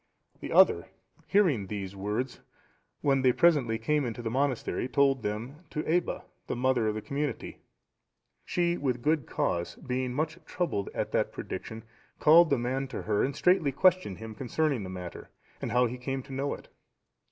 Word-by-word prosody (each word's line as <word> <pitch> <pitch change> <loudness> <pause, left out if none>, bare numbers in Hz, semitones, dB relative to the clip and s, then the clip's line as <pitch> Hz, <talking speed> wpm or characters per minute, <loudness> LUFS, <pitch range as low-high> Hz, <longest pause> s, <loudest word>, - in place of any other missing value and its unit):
The - - -6
other, - - +5 0.4
hearing 160 - +3
these 100 -1 -5
words, 105 +6 -3 0.6
when 135 -1 +3
they 130 -1 +5
presently 140 -7 +3
came 145 +6 +1
into 120 -1 -4
the 115 - -2
monastery, 130 -1 0
told 135 0 +3
them 110 +7 -4
to 155 - -3
Aebba,(717) 175 +2 0 0.2
the - - -2
mother 125 -2 +2
of 105 - 0
the 110 - -4
community. 145 +1 -3 0.8
She 175 0 0
with 125 -4 -1
good 155 -2 +1
cause 85 -1 -1
being 125 0 -3
much 155 +4 -2
troubled 170 - -2
at - - -2
that - - +1
prediction, 110 0 -6 0.4
called 165 +2 +7
the 140 - +3
man 130 +3 -1
to 125 - -6
her, 105 -1 +1
and 135 +1 -1
straitly 175 -4 +3
questioned 180 - +3
him 110 0 -8
concerning 135 +2 0
the 95 - -6
matter 90 -2 -7 0.3
and - - -3
how 125 0 +4
he 125 +1 -4
came 135 +1 -3
to 140 - -10
know 140 +2 -1
it. - - -14
130 Hz, 175 wpm, -29 LUFS, 115-150 Hz, 0.8 s, called